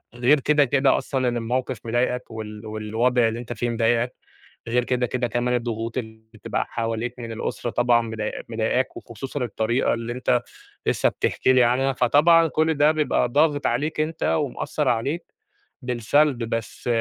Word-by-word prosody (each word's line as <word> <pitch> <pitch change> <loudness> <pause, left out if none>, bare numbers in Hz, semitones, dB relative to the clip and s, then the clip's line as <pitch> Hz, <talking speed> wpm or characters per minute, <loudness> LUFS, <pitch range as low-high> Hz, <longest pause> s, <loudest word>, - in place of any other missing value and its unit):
غير 125 +5 +4
كده، 145 +1 +3
كده 135 +1 +3
أصلًا 130 -2 -1
إن 120 -1 0
الموقِف 125 +2 -2
مضايقك 120 +1 -1
وال 110 -1 -7
والوضع 110 +3 +1
اللي 115 +1 -3
أنت 120 0 -6
فيه 120 +2 -2
مضايقك، 115 +1 +1 0.5
غير 120 +1 +1
كده، 125 0 0
كده 125 0 -1
كمان 120 +2 0
الضغوط 115 -1 -3
اللي 110 -3 -6
بتبقى 110 - -3
حواليك 115 +1 -2
من 115 -1 -6
الأسرة 115 +1 -3
طبعًا 120 0 +3
مضاي 110 -2 -4
مضايقاك 115 +3 -1
وخصوصًا 130 +4 -6
الطريقة 120 +1 0
اللي 115 +1 -4
أنت 125 -1 +1 0.4
لسّه - - +2
بتحكي 130 - +1
لي 130 -1 +5
عنها، 130 +3 +2
فطبعًا 155 +7 +5
كل 160 +1 +1
ده 150 0 +4
بيبقى 150 -5 +1
ضاغط 145 +2 +2
عليك 155 +1 -1
أنت 155 +1 -2
ومأثّر 150 0 -1
عليك 130 +8 -1 0.5
بالسلب، 125 +2 +1
بس 115 0 -4
120 Hz, 160 wpm, -23 LUFS, 115-135 Hz, 0.5 s, لي